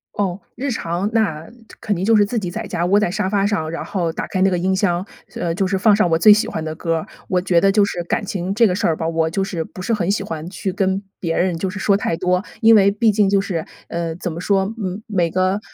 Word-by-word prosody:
哦， 195 Hz, -2 st, -1 dB, 0.2 s
日 275 Hz, +2 st, -3 dB
常， 175 Hz, -3 st, -2 dB
那 165 Hz, -9 st, 0 dB, 0.3 s
肯 210 Hz, -, -1 dB
定 180 Hz, -, -3 dB
就 225 Hz, +3 st, +4 dB
是 205 Hz, -1 st, +5 dB
自 230 Hz, +3 st, -2 dB
己 185 Hz, -4 st, -4 dB
在 175 Hz, -, -5 dB
家 170 Hz, -, -2 dB
窝 200 Hz, +3 st, +4 dB
在 195 Hz, -4 st, 0 dB
沙 200 Hz, -1 st, -1 dB
发 200 Hz, 0 st, +1 dB
上， 180 Hz, -7 st, -1 dB
然 165 Hz, -, -5 dB
后 175 Hz, -5 st, -1 dB
打 -, -, -4 dB
开 185 Hz, -, -2 dB
那 195 Hz, -, +5 dB
个 180 Hz, -, 0 dB
音 190 Hz, +2 st, +1 dB
箱， 185 Hz, -2 st, 0 dB, 0.3 s
呃， 170 Hz, -2 st, -2 dB
就 190 Hz, +2 st, 0 dB
是 190 Hz, +1 st, 0 dB
放 205 Hz, +2 st, +4 dB
上 205 Hz, -4 st, +2 dB
我 165 Hz, -, +3 dB
最 205 Hz, +6 st, +8 dB
喜 215 Hz, -, +1 dB
欢 160 Hz, -, -4 dB
的 155 Hz, -, -3 dB
歌 165 Hz, 0 st, -1 dB
儿。 160 Hz, -, -5 dB, 0.2 s
我 185 Hz, -, +1 dB
觉 180 Hz, -2 st, +2 dB
得 195 Hz, -, +4 dB
就 205 Hz, 0 st, +4 dB
是 175 Hz, -3 st, -4 dB
感 205 Hz, +5 st, -2 dB
情 190 Hz, -1 st, -3 dB
这 230 Hz, +2 st, +5 dB
个 190 Hz, -, +2 dB
事 185 Hz, -, 0 dB
儿 160 Hz, -, +1 dB
吧， 160 Hz, -, -3 dB
我 165 Hz, -1 st, 0 dB
就 195 Hz, +4 st, -1 dB
是 175 Hz, -4 st, -3 dB
不 185 Hz, -, -13 dB
是 230 Hz, +5 st, -1 dB
很 190 Hz, -5 st, 0 dB
喜 200 Hz, 0 st, 0 dB
欢 165 Hz, -3 st, -6 dB
去 190 Hz, 0 st, -4 dB
跟 195 Hz, +1 st, 0 dB, 0.2 s
别 165 Hz, -2 st, -2 dB
人 180 Hz, -1 st, +1 dB
就 190 Hz, -, -1 dB
是 205 Hz, -, -7 dB
说 200 Hz, 0 st, +2 dB
太 180 Hz, -4 st, -1 dB
多， 180 Hz, +1 st, +1 dB, 0.2 s
因 225 Hz, 0 st, +7 dB
为 200 Hz, -2 st, +6 dB
毕 215 Hz, +2 st, +2 dB
竟 205 Hz, -1 st, +2 dB
就 200 Hz, 0 st, +3 dB
是， 185 Hz, -5 st, -2 dB, 0.3 s
呃， 170 Hz, -1 st, -3 dB
怎 175 Hz, 0 st, -4 dB
么 165 Hz, -, -6 dB
说， 195 Hz, +2 st, +1 dB, 0.3 s
每 180 Hz, -6 st, 0 dB
个 185 Hz, +3 st, +1 dB
190 Hz, 295 characters per minute, -20 LUFS, 170-205 Hz, 0.3 s, 最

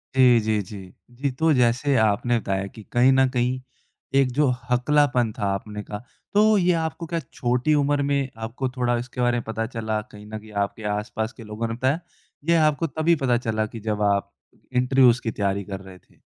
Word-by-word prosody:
जी, 125 Hz, -3 st, +6 dB
जी, 110 Hz, -1 st, 0 dB
जी। 95 Hz, -1 st, -10 dB, 0.2 s
जी, 140 Hz, +2 st, -1 dB
तो 160 Hz, +5 st, +1 dB
जैसे 125 Hz, +3 st, +2 dB
आपने 110 Hz, +2 st, +2 dB
बताया 95 Hz, -1 st, -2 dB
कि 110 Hz, -, -9 dB
कहीं 125 Hz, +2 st, +5 dB
न 130 Hz, 0 st, +4 dB
कहीं 125 Hz, 0 st, 0 dB, 0.6 s
एक 130 Hz, -2 st, +2 dB
जो 145 Hz, +2 st, +2 dB, 0.2 s
हकलापन 125 Hz, -2 st, +3 dB
था, 100 Hz, -, -3 dB
आपने 105 Hz, +1 st, -5 dB
कहा, 105 Hz, -, -6 dB, 0.3 s
तो 215 Hz, +1 st, +5 dB
ये 180 Hz, -1 st, +3 dB
आपको 160 Hz, +1 st, -4 dB
क्या 170 Hz, 0 st, -2 dB
छोटी 125 Hz, +1 st, 0 dB
उम्र 145 Hz, 0 st, +2 dB
में 140 Hz, -2 st, +1 dB
आपको 120 Hz, +4 st, -3 dB
थोड़ा 120 Hz, -1 st, +1 dB
इसके 125 Hz, +1 st, -5 dB
बारे 120 Hz, 0 st, +2 dB
में 120 Hz, -, -3 dB
पता 110 Hz, 0 st, -2 dB
चला? 110 Hz, -3 st, -2 dB
कहीं 105 Hz, -2 st, -14 dB
न 110 Hz, 0 st, -6 dB
कहीं 110 Hz, 0 st, -14 dB
आपके 110 Hz, +2 st, -11 dB
आसपास 110 Hz, +2 st, -4 dB
के 115 Hz, -, -9 dB
लोगों 110 Hz, +2 st, -4 dB
ने 115 Hz, -, -3 dB
बताया? 130 Hz, +7 st, 0 dB, 0.5 s
या 165 Hz, -2 st, +5 dB
आपको 155 Hz, +2 st, 0 dB
तभी 160 Hz, +3 st, +2 dB
पता 120 Hz, -2 st, +3 dB
चला 110 Hz, -3 st, -1 dB
कि 115 Hz, +1 st, -8 dB
जब 105 Hz, -1 st, -2 dB
आप 100 Hz, 0 st, -2 dB, 0.4 s
इंटरव्यूज़ 125 Hz, -1 st, +4 dB
की 115 Hz, -, -2 dB
तैयारी 100 Hz, -1 st, -1 dB
कर 95 Hz, -1 st, -6 dB
रहे 95 Hz, -1 st, -12 dB
थे? -, -, -29 dB
120 Hz, 200 wpm, -24 LUFS, 110-135 Hz, 0.6 s, जी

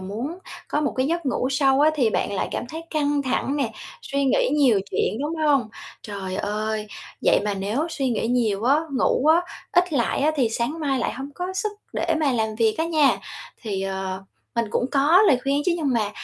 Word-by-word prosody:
muốn 230 Hz, -, -5 dB, 0.3 s
có 295 Hz, -, 0 dB
một 290 Hz, -, 0 dB
cái 260 Hz, +1 st, +1 dB
giấc 335 Hz, 0 st, -1 dB
ngủ 255 Hz, -1 st, 0 dB
sâu 270 Hz, 0 st, +3 dB
á, 305 Hz, +1 st, +6 dB
thì 245 Hz, -7 st, +2 dB
bạn -, -, -1 dB
lại 195 Hz, -, -1 dB
cảm -, -, -3 dB
thấy 320 Hz, +3 st, -6 dB
căng 290 Hz, -2 st, +1 dB
thẳng 270 Hz, +1 st, -1 dB
nè, 260 Hz, -6 st, -1 dB, 0.3 s
suy 280 Hz, 0 st, -1 dB
nghĩ 265 Hz, -, +2 dB
nhiều 265 Hz, -9 st, +4 dB
chuyện, 215 Hz, -, 0 dB
đúng 300 Hz, +3 st, -2 dB
hông? 275 Hz, -7 st, +3 dB, 0.3 s
Trời 195 Hz, -3 st, -5 dB
ơi, 215 Hz, +1 st, -2 dB, 0.4 s
vậy -, -, +4 dB
mà 205 Hz, -1 st, 0 dB
nếu 210 Hz, +11 st, -1 dB
suy 275 Hz, -5 st, -1 dB
nghĩ 225 Hz, -2 st, -1 dB
nhiều 225 Hz, -4 st, +1 dB
á, 275 Hz, +4 st, +5 dB, 0.2 s
ngủ 265 Hz, +1 st, +1 dB
á, 320 Hz, +2 st, +6 dB, 0.3 s
ít 355 Hz, -2 st, +3 dB
lại 240 Hz, -5 st, +1 dB
á, 300 Hz, +2 st, +3 dB
thì 255 Hz, -5 st, +2 dB
sáng 240 Hz, +8 st, -2 dB
mai 275 Hz, -3 st, 0 dB
lại 235 Hz, -, -1 dB
hông 270 Hz, +3 st, -7 dB
có 360 Hz, +1 st, -4 dB
sức 420 Hz, +2 st, -1 dB, 0.2 s
để 330 Hz, -, 0 dB
mà 290 Hz, -3 st, +2 dB
làm 220 Hz, -2 st, -1 dB
việc 220 Hz, -1 st, +2 dB
á 320 Hz, -, +2 dB
nha. 310 Hz, -4 st, +3 dB, 0.4 s
Thì, 200 Hz, -5 st, -3 dB
ờ, 190 Hz, 0 st, -3 dB, 0.5 s
cũng 245 Hz, -, 0 dB
có 300 Hz, +8 st, +5 dB
lời 260 Hz, -, +5 dB
khuyên 280 Hz, +1 st, +1 dB
chứ, 355 Hz, -, +2 dB
nhưng 295 Hz, -5 st, 0 dB
mà 215 Hz, -3 st, 0 dB
265 Hz, 215 wpm, -23 LUFS, 220-295 Hz, 0.5 s, á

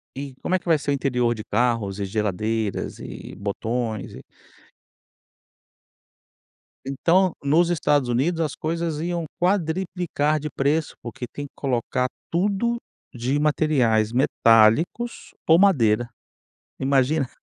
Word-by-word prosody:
E 135 Hz, -1 st, -6 dB
como 185 Hz, -, 0 dB
é -, -, +1 dB
que -, -, -29 dB
vai 165 Hz, -3 st, +4 dB
ser 145 Hz, 0 st, -2 dB
o -, -, +3 dB
interior 125 Hz, -4 st, +1 dB
de 110 Hz, -, -7 dB
carros 115 Hz, -6 st, 0 dB
e 100 Hz, -, -1 dB
geladeiras 105 Hz, +1 st, -2 dB
e -, -, -9 dB
botões 110 Hz, +2 st, -3 dB
e -, -, -10 dB, 2.6 s
Então, 170 Hz, +7 st, +2 dB
nos 160 Hz, +5 st, +3 dB
Estados 145 Hz, -6 st, +1 dB
Unidos 155 Hz, +8 st, +1 dB
as 155 Hz, -3 st, -2 dB
coisas 165 Hz, -1 st, -2 dB
iam 170 Hz, 0 st, -2 dB
quadruplicar 175 Hz, -4 st, 0 dB
de 150 Hz, +1 st, -4 dB
preço, 150 Hz, +3 st, 0 dB
porque 120 Hz, +1 st, -7 dB
tem 145 Hz, +5 st, -7 dB
que 140 Hz, -, -14 dB
colocar 125 Hz, -1 st, -1 dB, 0.2 s
tudo 200 Hz, +7 st, +1 dB, 0.4 s
de 125 Hz, +4 st, -1 dB
materiais 135 Hz, -8 st, +2 dB
metálicos 120 Hz, -, +2 dB
ou 165 Hz, +1 st, +6 dB
madeira, 120 Hz, -, +3 dB, 0.7 s
imagina. 135 Hz, +1 st, +2 dB
140 Hz, 125 wpm, -23 LUFS, 120-165 Hz, 2.6 s, ou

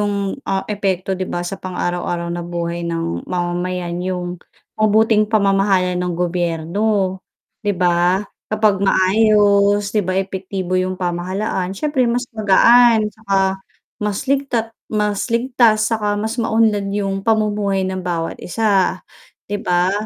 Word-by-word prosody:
'yung, 200 Hz, +2 st, -2 dB
ah, 195 Hz, 0 st, 0 dB
epekto 195 Hz, -2 st, -2 dB
'di 185 Hz, 0 st, -3 dB
ba 175 Hz, -, -3 dB
sa 190 Hz, +2 st, -5 dB
pang-araw-araw 175 Hz, -1 st, -3 dB
na 175 Hz, -, -3 dB
buhay 170 Hz, 0 st, -4 dB
ng 165 Hz, -, -3 dB
mamamayan 175 Hz, 0 st, -2 dB
'yung 180 Hz, -1 st, -4 dB, 0.4 s
mabuting 215 Hz, 0 st, +3 dB
pamamahala 195 Hz, -3 st, +2 dB
ng 180 Hz, 0 st, -1 dB
gobyerno, 180 Hz, +3 st, -1 dB, 0.4 s
'di 205 Hz, -3 st, -1 dB
ba? 180 Hz, +2 st, +2 dB, 0.2 s
Kapag 215 Hz, -2 st, +2 dB
maayos 205 Hz, +1 st, +3 dB
'di 215 Hz, -, +2 dB
ba, 185 Hz, +1 st, -1 dB
epektibo 190 Hz, -1 st, -2 dB
'yung 185 Hz, 0 st, -2 dB
pamahalaan 185 Hz, +2 st, -2 dB
siyempre 265 Hz, 0 st, +1 dB
mas 245 Hz, +1 st, 0 dB
magaan 225 Hz, +2 st, +5 dB
tsaka 195 Hz, -3 st, 0 dB, 0.4 s
mas 205 Hz, -1 st, -1 dB
ligta 265 Hz, -5 st, 0 dB, 0.2 s
mas 210 Hz, 0 st, 0 dB
ligtas 230 Hz, -2 st, +2 dB
saka 210 Hz, -2 st, 0 dB
mas 220 Hz, +3 st, -3 dB
maunlad 220 Hz, -3 st, +1 dB
'yung 195 Hz, -1 st, -2 dB
pamumuhay 210 Hz, -2 st, +1 dB
ng 185 Hz, 0 st, -3 dB
bawat 170 Hz, -2 st, -3 dB
isa, 195 Hz, -2 st, +1 dB, 0.4 s
'di 205 Hz, 0 st, -4 dB
ba? 180 Hz, +1 st, +1 dB
195 Hz, 130 wpm, -19 LUFS, 180-215 Hz, 0.4 s, magaan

